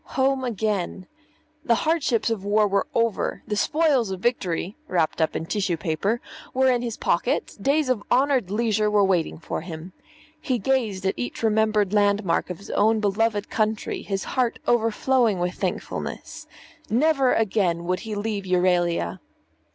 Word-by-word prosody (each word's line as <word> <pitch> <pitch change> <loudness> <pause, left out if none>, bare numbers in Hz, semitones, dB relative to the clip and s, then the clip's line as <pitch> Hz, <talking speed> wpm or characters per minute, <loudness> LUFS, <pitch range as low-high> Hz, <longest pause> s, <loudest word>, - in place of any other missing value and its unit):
Home 265 0 +2
again! 210 -6 -2 0.6
The 235 -7 +3
hardships 285 -8 +1
of 220 -4 -1
the 200 - -8
war 210 +1 +3
were 200 0 0
over; 230 -3 0
the 210 - -2
spoils 290 -2 +2
of 190 -1 -4
victory 195 -4 -1
(wrapped 165 -2 0
up 160 - +1
in 160 - -2
tissue 190 -2 -1
paper) 170 +9 -1 0.4
were 260 0 +4
in 245 -1 +1
his 235 -2 -4
pocket; 170 - 0
days 285 +4 +2
of 255 -5 +1
honoured 260 -5 +3
leisure 215 0 +1
were 210 -1 +3
waiting 185 -4 +1
for 160 - -5
him. 170 +1 -8 0.5
He 255 -3 0
gazed 220 -5 0
at 190 - +2
each 120 - -5
remembered 215 -2 +2
landmark 200 -4 +2
of 180 - -5
his 200 - -10
own 220 +2 +3
beloved 210 0 0
country, 215 -1 -1
his 195 -2 -3
heart 250 -3 0
overflowing 235 -1 +2
with 180 0 -1
thankfulness. - - -5 0.4
Never 270 +2 +3
again 190 -6 +1
would 180 +1 -1
he 220 -2 -5
leave 205 -1 -3
Euralia! 175 - +1
210 Hz, 160 wpm, -24 LUFS, 185-235 Hz, 0.6 s, were